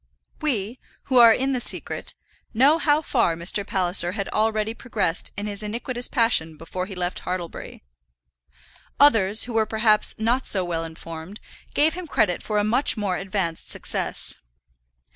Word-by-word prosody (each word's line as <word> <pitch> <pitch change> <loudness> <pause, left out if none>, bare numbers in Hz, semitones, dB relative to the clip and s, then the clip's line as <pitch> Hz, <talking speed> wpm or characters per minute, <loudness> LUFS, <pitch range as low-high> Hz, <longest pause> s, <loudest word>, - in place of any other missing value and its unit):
We, 240 -6 -2 0.2
who 260 - 0
are 230 -1 +9
in 265 +4 0
the 255 - -1
secret, - - 0 0.4
know 280 +7 +4
how 300 0 +2
far 230 - +1
Mr. 175 +5 +1
Palliser 180 -2 +2
had 200 -1 -4
already 220 0 0
progressed 205 -9 -2
in 205 - -4
his 205 0 -4
iniquitous 240 +3 -1
passion 165 -10 0
before 180 +3 -6
he 195 - -8
left 180 0 -3
Hartlebury. 180 - -6 1.2
Others, 220 -7 +6
who 240 - -6
were 220 -1 +1
perhaps 220 -1 +2
not 235 +4 0
so 190 -3 +1
well 165 -1 -3
informed, 165 +4 -9 0.4
gave 305 +2 +3
him 360 -1 -7
credit 180 - 0
for 210 - -3
a 205 - +2
much 235 +5 +1
more 200 -3 -1
advanced 190 -4 -3
success. - - -1
210 Hz, 155 wpm, -23 LUFS, 180-240 Hz, 1.2 s, are